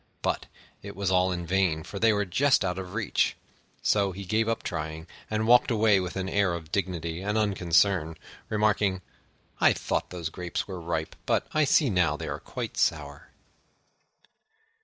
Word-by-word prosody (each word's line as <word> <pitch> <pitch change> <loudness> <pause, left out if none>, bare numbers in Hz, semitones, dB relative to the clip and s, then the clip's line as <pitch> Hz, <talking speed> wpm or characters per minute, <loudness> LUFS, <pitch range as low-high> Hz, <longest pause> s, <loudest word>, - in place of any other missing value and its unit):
But - - -1 0.3
it - - -9
was 95 -1 -1
all 90 0 +3
in 85 -1 -3
vain, 90 -3 +1
for 100 - -7
they 115 +1 +5
were 105 -1 +1
just 130 +4 +2
out 90 0 -2
of 95 +1 -7
reach: 110 -3 0 0.5
so 100 -2 +2
he 100 +2 -7
gave 110 +4 +1
up 115 - -1
trying, 80 +1 -4 0.2
and 110 0 0
walked 120 +2 +5
away 110 -3 +4
with 90 -1 -4
an 95 -1 -2
air 95 -2 +1
of 80 -1 -9
dignity 85 -3 -2
and 105 +2 -1
unconcern, 90 -4 +2 0.3
remarking, 105 -3 +1 0.6
"I - - +5
thought - - -2
those 85 -3 -4
Grapes 90 -1 -4
were 95 -3 -6
ripe, 80 -1 -3
but - - +1
I 155 -1 +3
see 140 -2 +3
now 90 -3 +2
they - - -6
are - - -4
quite - - -6
sour." - - -1
95 Hz, 175 wpm, -27 LUFS, 85-105 Hz, 0.6 s, they